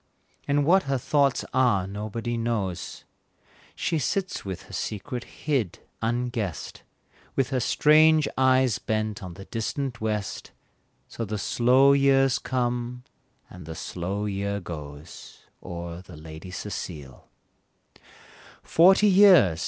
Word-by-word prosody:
And 145 0 +2
what 185 +3 +4
her 135 - +2
thoughts 140 +1 +1
are 125 -8 +3
nobody 110 +4 -4
knows, 115 -6 -3 0.7
She 165 - -1
sits 190 +5 -2
with 95 -3 -6
her - - -15
secret 120 +4 -4 0.2
hid, 130 - 0 0.2
unguessed, 115 - -3 0.5
With 135 0 0
her 130 - +1
strange 155 +4 +4
eyes 130 -5 +3
bent 110 0 -2
on 90 -3 -8
the 95 +1 -10
distant 120 +3 -4
west, 105 -2 -3 0.5
So 115 - -6
the 105 0 -3
slow 130 +7 +4
years 135 -2 +3
come, 125 -1 -2 0.4
and - - -12
the 80 - -6
slow 95 +6 -4
year 100 0 -2
goes, 75 -3 -10 0.2
O'er 85 0 -7
the 90 - -13
Lady 80 +3 -10
Cecile. 80 -8 -7 1.3
Forty 190 +5 +5
years! 185 - +6
115 Hz, 120 wpm, -26 LUFS, 95-135 Hz, 1.3 s, years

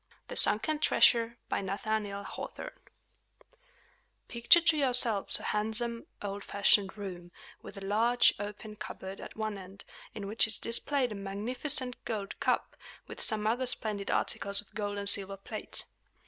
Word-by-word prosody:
THE - - -6
SUNKEN 295 +9 +2
TREASURE 235 -5 +3
By - - -2
Nathaniel 200 +1 -3
Hawthorne - - -8 1.5
Picture 240 +9 +4
to 325 -1 +2
yourselves 245 -7 +5
a - - -11
handsome, 225 +2 0 0.2
old 200 0 -5
fashioned 200 0 +1
room, 180 -4 -8 0.3
with - - -12
a 195 - -8
large, 230 +5 +3
open 210 +1 -8
cupboard 195 -2 -8
at - - -10
one 215 -2 -4
end, 190 +1 -13 0.3
in 205 -2 -6
which 215 +2 +2
is 220 - 0
displayed 250 +2 +1
a - - -4
magnificent 245 +7 +1
gold 205 -4 -5
cup, - - -1 0.3
with - - -10
some 215 -2 +1
other 245 +4 +1
splendid 210 -4 -4
articles 200 0 +3
of 205 - -7
gold 205 -1 -4
and 200 0 -5
silver 195 -1 +1
plate. 195 - -5
215 Hz, 150 wpm, -30 LUFS, 200-235 Hz, 1.5 s, yourselves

